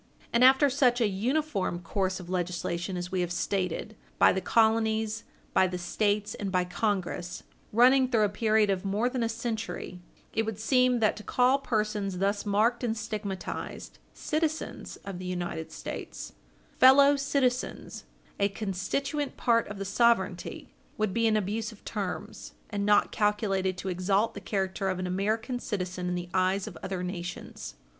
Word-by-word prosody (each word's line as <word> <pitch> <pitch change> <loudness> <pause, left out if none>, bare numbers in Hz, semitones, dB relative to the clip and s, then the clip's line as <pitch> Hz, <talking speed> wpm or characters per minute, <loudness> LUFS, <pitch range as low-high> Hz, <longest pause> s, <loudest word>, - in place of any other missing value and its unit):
And 235 +1 +4
after 265 +3 +7
such 255 -2 +3
an 215 -4 +2
uniform 235 - 0
course 185 +2 -2
of 180 - -9
legislation 180 0 -2
as 175 0 -5
we 185 -1 0
have 175 -1 -2
stated, 185 +3 -2 0.2
by - - +6
the 190 - -1
colonies, 220 +1 +2 0.3
by 190 - +4
the 180 0 -4
States, 205 +3 0
and 200 -2 -4
by 180 -1 +2
Congress, 180 -2 -2 0.3
running 255 +3 +5
through 225 -4 +3
a - - +4
period 215 0 +2
of 185 -1 -1
more 205 +5 +1
than 250 -1 -2
a 230 - +1
century, 225 -5 -4 0.3
it 225 - +2
would 220 -2 -4
seem 250 +1 +3
that 215 - +3
to 215 - -8
call 255 +4 +3
persons 210 -6 -1
thus 200 +2 0
marked 225 +5 +2
and 230 -2 0
stigmatized 205 -4 -5
"citizens" 315 0 -3
of 195 -3 -6
the 185 - -7
United 175 -3 -4
States, - - -7 0.5
"fellow 280 +2 +8
citizens," 275 -3 -1 0.3
a 200 0 +3
constituent 240 +9 -2
part 230 -2 +2
of 205 - -7
the 195 - -4
sovereignty, 200 -3 +1 0.2
would 215 -3 0
be 230 0 +2
an 215 -1 +3
abuse 215 +2 -2
of 215 - -17
terms, 200 -4 -5 0.2
and 205 -1 -1
not 205 0 +4
calculated 195 -3 0
to 190 - -6
exalt 195 +4 +1
the - - -8
character 195 -1 -1
of 185 - -1
an 185 - -3
American 215 +7 -1
citizen 185 -5 -3
in 180 - -1
the 175 0 -5
eyes 185 +1 +2
of - - -8
other 190 -1 -3
nations. 180 -1 -6
205 Hz, 165 wpm, -28 LUFS, 185-230 Hz, 0.5 s, fellow